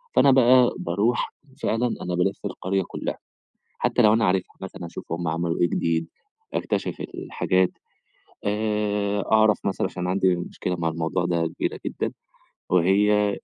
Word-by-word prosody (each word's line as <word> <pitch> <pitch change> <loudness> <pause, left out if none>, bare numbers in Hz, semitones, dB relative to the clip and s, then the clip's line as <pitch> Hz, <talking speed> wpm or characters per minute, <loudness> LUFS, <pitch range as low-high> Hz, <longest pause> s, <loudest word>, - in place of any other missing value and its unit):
فأنا 140 - +6
بقى 125 -1 +5
باروح 100 +8 0 0.3
فعلًا 120 +2 +1
أنا 90 -1 -2
بالِف 95 +3 -1
القرية 95 0 -1
كُلّها، - - -4 0.6
حتّى - - +2
لو 105 0 +6
أنا 115 0 +3
عارفها 90 -1 0
مثلًا 95 -2 -7
هاشوف 85 -1 -8
هم 85 0 -2
عملوا 85 +1 -1
إيه 85 - +4
جديد، 80 0 0 0.5
أكتِشف - - -2
الحاجات، 95 0 +1 0.7
آآ 105 -1 0
أعرف 110 -2 +5
مثلًا 95 - 0
عشان 90 -1 -4
عندي 95 -1 +2
مشكلة 90 +1 -4
مع 85 -1 -1
الموضوع 80 +2 -1
ده 85 -1 +1
كبيرة - - -3
جدًا، - - -2 0.6
وهي 100 +3 +3
95 Hz, 145 wpm, -24 LUFS, 85-105 Hz, 0.7 s, فأنا